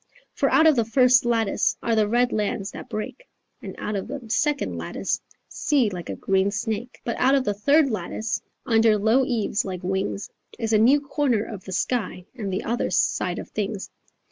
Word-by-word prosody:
For - - +1
out 320 - +5
of 315 -2 +6
the 235 - +2
first 250 +2 +4
lattice 230 -3 +1
Are 230 - +1
the 215 -1 +3
red 245 +3 +2
lands 205 -1 -1
that - - -9
break 215 - -6 0.3
And - - -8
out 210 - -3
of 195 - -3
the 285 +3 -5
second 295 +3 0
lattice - - -3 0.3
Sea 260 -8 +1
like 180 -2 -7
a - - -3
green 195 0 +1
snake, 220 +3 -4
But 235 - -3
out 265 +2 +4
of 270 - +2
the 205 - 0
third 280 +7 +3
lattice 215 +3 -3 0.2
Under 225 -2 +4
low 220 +6 +3
eaves 225 -5 0
like 185 -2 -6
wings 190 +2 -2 0.3
Is 225 -2 -2
a 215 - +5
new 265 +6 +5
corner 280 -6 0
of 205 -4 -8
the 190 - -7
sky 185 -3 -2
And 215 -6 -4
the 190 - -2
other 235 +2 -1
side - - 0
of - - -7
things." 205 -1 -4
225 Hz, 195 wpm, -24 LUFS, 205-255 Hz, 0.3 s, of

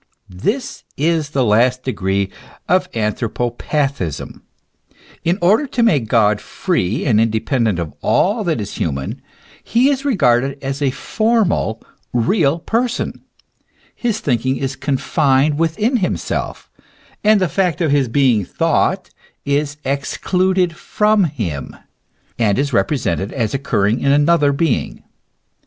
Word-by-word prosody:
This 205 - -3
is 155 0 +1
the 135 -4 0
last 125 +4 +2
degree 100 -5 -1 0.4
of 185 +1 +2
anthropo 115 +2 -1
pathism. 135 - -3 0.8
In 170 +3 +1
order 215 +11 +4
to 245 -2 0
make 145 - +2
God 105 -2 +3
free 115 - -1
and 110 -6 +3
independent 115 -1 0
of 85 -4 -4
all 210 +4 +2
that 165 -7 0
is 105 -1 -5
human, 70 -4 -3 0.4
he 250 +5 +3
is 270 -1 -2
regarded 135 - +2
as 135 +1 -3
a 140 - +2
formal, 205 - 0 0.3
real 140 - +2
person, 235 +7 -2 0.7
his 230 -3 -2
thinking 130 0 0
is 135 0 -3
confined 140 +1 +1
within 210 - +1
himself, 190 -5 -3 0.5
and 215 0 +5
the 185 - +2
fact 175 0 0
of 160 -5 +1
his 140 -3 +2
being 120 -4 +2
thought - - 0 0.3
is 145 +1 -1
excluded 180 +6 0
from 210 +3 +2
him, 100 - -4 0.6
and 105 -4 +2
is 140 0 -1
represented 100 - 0
as 115 -5 -1
occurring 115 -5 0
in 140 - +2
another 145 0 +4
being. 140 -2 -1
140 Hz, 125 wpm, -18 LUFS, 115-180 Hz, 0.8 s, and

